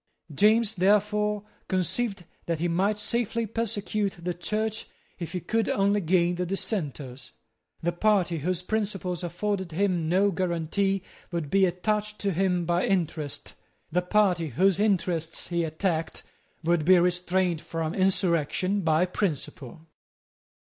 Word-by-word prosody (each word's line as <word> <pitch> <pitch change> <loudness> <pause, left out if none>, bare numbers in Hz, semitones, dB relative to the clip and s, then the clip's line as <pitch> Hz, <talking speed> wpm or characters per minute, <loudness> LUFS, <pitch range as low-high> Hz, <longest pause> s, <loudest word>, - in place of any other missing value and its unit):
James, 215 +6 +4
therefore, 210 +2 +2 0.2
conceived 190 +1 0 0.2
that 170 -1 0
he 170 +3 0
might 190 +5 +1
safely 230 +1 -1
persecute 215 -2 -1
the 175 +1 -2
Church 215 +5 -2 0.3
if 170 0 -5
he 180 - -1
could 225 +5 0
only 200 +1 +2
gain 175 0 +2
the 180 +1 -2
Dissenters. 145 - -3 0.5
The 175 - +1
party 180 -2 +2
whose 180 +3 -1
principles 195 -4 -2
afforded 185 0 -2
him 180 -3 +1
no 195 +3 +3
guarantee 185 +2 0 0.3
would 165 -5 -3
be 195 -1 +5
attached 210 +4 -1
to 200 - +1
him 180 0 +1
by 175 +1 +1
interest. 165 -6 -2 0.4
The 180 +3 +2
party 180 -3 +2
whose 185 - +2
interests 180 -6 0
he 170 -1 0
attacked 160 0 -2 0.4
would 170 -1 +2
be 185 +3 +6
restrained 180 -1 +1
from 165 -1 -3
insurrection 185 0 +1
by 165 0 +3
principle. 160 - -4
180 Hz, 130 wpm, -27 LUFS, 170-205 Hz, 0.5 s, be